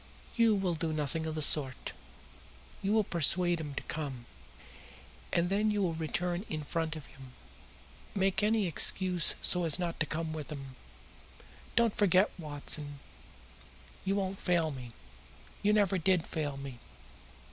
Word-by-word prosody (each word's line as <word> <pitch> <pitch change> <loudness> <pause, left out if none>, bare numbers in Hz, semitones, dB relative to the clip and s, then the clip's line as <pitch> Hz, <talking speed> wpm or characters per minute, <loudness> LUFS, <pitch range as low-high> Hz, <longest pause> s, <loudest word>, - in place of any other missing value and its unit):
"You 230 -2 +4
will 190 -3 0
do 160 0 -2
nothing 155 +1 -1
of 155 - -4
the 155 - +2
sort. 135 -3 +4 0.9
You 195 - -1
will 220 0 +4
persuade 175 0 +2
him 145 -3 -6
to - - -4
come. 135 -6 -5 1.1
And 170 0 +2
then 205 +3 +1
you 205 -1 +1
will 170 -3 0
return 175 +3 -2
in 155 -1 -4
front 160 +1 -2
of 155 - -8
him. 135 -3 -14 0.8
Make 195 0 +2
any 215 0 +2
excuse 180 +1 +3
so 180 -1 +4
as 165 -2 +4
not 175 -2 -3
to 155 - 0
come 160 0 -3
with 155 -1 -6
him. 135 -3 -8 1.0
Don't 235 -3 +3
forget, 195 0 +4
Watson. 145 -1 -2 1.1
You 195 +1 0
won't 195 -1 -2
fail 170 -3 +1
me. 125 -3 -8 0.7
You 205 - +3
never 200 -3 +2
did 180 -1 +2
fail 145 -4 -3
me. 135 -3 -8
165 Hz, 150 wpm, -31 LUFS, 150-190 Hz, 1.1 s, You